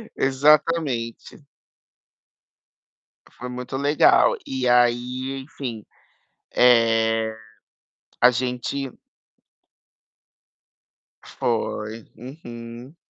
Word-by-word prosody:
Exatamente. 140 -2 +1 1.9
Foi 125 - -7
muito 125 +1 -6
legal. 145 - +4
E 130 -1 -2
aí, 125 +2 +1
enfim, 125 -6 -7 0.7
eh, 115 -2 +3 0.9
a 125 - +7
gente 125 +2 -3 2.4
Foi. 110 -1 -3
Uhum. 120 0 -10
125 Hz, 55 wpm, -23 LUFS, 115-135 Hz, 2.4 s, a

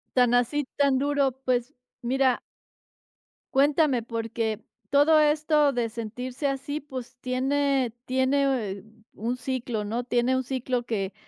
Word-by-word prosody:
Tan 245 -2 +4
así, 245 +4 +2
tan 280 -2 +3
duro. 280 0 +2
Pues, 250 +1 0 0.3
mira 260 +1 +2 1.1
cuéntame, 280 -3 +3
porque 225 -1 -3 0.3
todo 290 +3 +5
esto 300 -1 +3
de 240 -2 -1
sentirse 245 +5 -4
así 275 +2 -3
pues, 260 -3 -8
tiene 265 -1 +1
tiene 260 -6 0 0.3
un 235 +4 -3
ciclo, 250 -4 -3
¿no? 235 +4 -2
Tiene 245 +1 +1
un 260 - 0
ciclo 255 -1 -2
que, 200 -4 -2
255 Hz, 120 wpm, -26 LUFS, 240-280 Hz, 1.1 s, todo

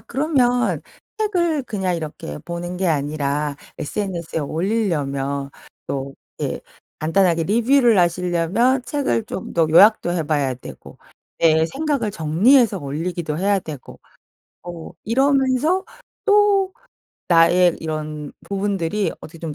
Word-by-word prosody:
그러면 250 -1 +1 0.3
'책을 345 -9 0
그냥 190 -7 -2
이렇게 150 - -6
보는 175 +1 -5
게 190 +1 -1
아니라 145 -1 -1 0.2
SNS에 170 -2 -3
올리려면 145 -6 -1 0.4
또 135 0 -4 0.3
예 - - -2 0.4
간단하게 165 +1 +2
리뷰를 235 - +3
하시려면 180 +8 +1
책을 275 -6 -1
좀 190 - -7
더 165 -1 +3
요약도 175 +1 +6
해 175 - 0
봐야 145 -3 0
되고 125 - -11 0.4
내 160 -1 +4
생각을 275 - -1
정리해서 200 - +3
올리기도 155 +2 -4
해야 200 +2 +2
되고 155 -7 -9 0.7
또 175 -2 -9
이러면서 270 - +2 0.4
또 410 -2 +3 0.6
나의 175 +1 +5
이런 155 -2 -5 0.2
부분들이 200 -1 -1
어떻게 165 +1 -11
좀 160 -2 -5
180 Hz, 255 characters per minute, -21 LUFS, 155-240 Hz, 0.7 s, 요약도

